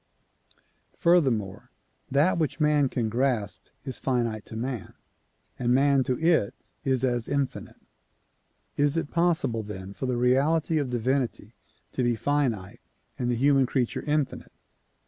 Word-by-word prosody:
Furthermore, 130 Hz, -, +2 dB, 0.4 s
that 150 Hz, +6 st, +3 dB
which 155 Hz, 0 st, -1 dB
man 150 Hz, -3 st, +3 dB
can 120 Hz, -3 st, -1 dB
grasp 115 Hz, -3 st, -1 dB, 0.2 s
is 130 Hz, -3 st, -6 dB
finite 115 Hz, -5 st, -1 dB
to -, -, -8 dB
man, 120 Hz, -1 st, -4 dB, 0.6 s
and 125 Hz, 0 st, +2 dB
man 140 Hz, 0 st, +4 dB
to 125 Hz, -, 0 dB
it 160 Hz, -10 st, +2 dB, 0.3 s
is 130 Hz, -1 st, 0 dB
as 120 Hz, -3 st, 0 dB
infinite. 140 Hz, -2 st, -3 dB, 1.0 s
Is 145 Hz, +2 st, +2 dB
it 165 Hz, -, -2 dB
possible 170 Hz, -9 st, +1 dB
then 100 Hz, -2 st, -8 dB
for 130 Hz, -, -4 dB
the 125 Hz, -1 st, 0 dB
reality 145 Hz, +6 st, +2 dB
of 140 Hz, -3 st, -2 dB
divinity 125 Hz, -2 st, -1 dB, 0.4 s
to -, -, -2 dB
be 120 Hz, -1 st, +2 dB
finite 125 Hz, -7 st, -1 dB, 0.4 s
and 125 Hz, -, 0 dB
the 120 Hz, -, +1 dB
human 135 Hz, +1 st, +3 dB
creature 125 Hz, -2 st, -1 dB
infinite? 150 Hz, -3 st, -2 dB
130 Hz, 135 wpm, -26 LUFS, 120-145 Hz, 1.0 s, man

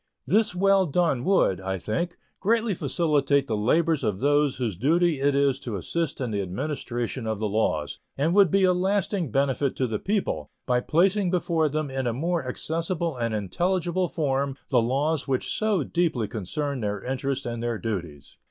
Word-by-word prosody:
This 215 Hz, -3 st, +2 dB
well 195 Hz, 0 st, +4 dB
done 155 Hz, -5 st, +1 dB
would, 175 Hz, -, +3 dB
I 95 Hz, 0 st, -2 dB
think, 170 Hz, -, -3 dB, 0.2 s
greatly 225 Hz, +1 st, +1 dB
facilitate 145 Hz, -3 st, +1 dB
the 110 Hz, -, -2 dB
labors 155 Hz, +9 st, +2 dB
of 100 Hz, -3 st, -1 dB
those 145 Hz, 0 st, +2 dB
whose 120 Hz, -6 st, -2 dB
duty 160 Hz, -, +2 dB
it 140 Hz, 0 st, +2 dB
is 140 Hz, -1 st, +2 dB
to 120 Hz, -6 st, -5 dB
assist 155 Hz, -, -2 dB
in 125 Hz, -4 st, -2 dB
the 100 Hz, -1 st, -1 dB
administration 120 Hz, +3 st, -3 dB
of 110 Hz, -1 st, -1 dB
the 105 Hz, +1 st, -1 dB
laws, 90 Hz, -9 st, -1 dB, 0.2 s
and 155 Hz, +5 st, +1 dB
would 200 Hz, -2 st, +6 dB
be 195 Hz, +4 st, +3 dB
a 185 Hz, -1 st, +5 dB
lasting 190 Hz, -2 st, 0 dB
benefit 135 Hz, +2 st, 0 dB
to 130 Hz, -, 0 dB
the 110 Hz, -3 st, -2 dB
people, 190 Hz, -, -1 dB, 0.2 s
by 125 Hz, -1 st, +2 dB
placing 185 Hz, +8 st, +2 dB
before 170 Hz, -3 st, +1 dB
them 150 Hz, -1 st, -2 dB
in 130 Hz, -1 st, -2 dB
a 120 Hz, -, 0 dB
more 165 Hz, +2 st, -1 dB
accessible 165 Hz, +3 st, -2 dB
and 115 Hz, -2 st, -1 dB
intelligible 175 Hz, -, 0 dB
form 140 Hz, -4 st, -1 dB, 0.2 s
the 125 Hz, -3 st, +4 dB
laws 140 Hz, +5 st, 0 dB
which 130 Hz, -2 st, -1 dB
so 215 Hz, -7 st, +1 dB
deeply 155 Hz, -9 st, 0 dB
concern 130 Hz, -, -3 dB
their 105 Hz, -2 st, -3 dB
interests 135 Hz, +1 st, -2 dB
and 120 Hz, -1 st, -4 dB
their 120 Hz, -1 st, -1 dB
duties. 85 Hz, -11 st, -5 dB
140 Hz, 180 wpm, -26 LUFS, 115-170 Hz, 0.2 s, would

